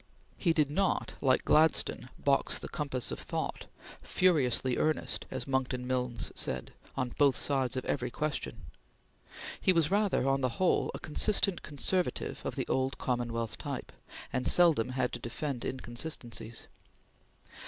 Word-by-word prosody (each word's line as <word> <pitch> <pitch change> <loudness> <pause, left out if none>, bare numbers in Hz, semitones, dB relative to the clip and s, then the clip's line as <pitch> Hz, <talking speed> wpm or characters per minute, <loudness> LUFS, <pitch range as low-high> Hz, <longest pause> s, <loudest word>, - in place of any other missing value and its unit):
He 170 - +2
did 150 -3 +2
not, 190 +4 0
like 130 -2 +3
Gladstone, 155 -4 +3
box 140 -1 +2
the - - -6
compass 140 -5 -2
of - - -4
thought; - - -4 0.3
"furiously 135 -8 +3
earnest," 155 0 0
as 130 -2 -4
Monckton 130 -2 -1
Milnes 125 -2 -1
said, 65 -1 -2 0.2
"on 125 - 0
both 140 -3 +5
sides 135 -3 +1
of 130 - -3
every 125 -3 -1
question"; 150 +4 -3 1.0
he - - +5
was 165 -2 +2
rather, 200 -9 +2
on 135 0 +2
the 125 -3 -1
whole, 185 - +2
a - - -6
consistent 195 +3 +2
conservative 175 +5 -2
of - - -3
the - - -1
old 130 +1 0
Commonwealth 115 -2 -2
type, - - -5 0.4
and 125 0 0
seldom 165 -10 +5
had 130 -1 -1
to 120 - -4
defend 120 +2 -4
inconsistencies. 120 -3 -5
130 Hz, 145 wpm, -31 LUFS, 125-155 Hz, 1.0 s, both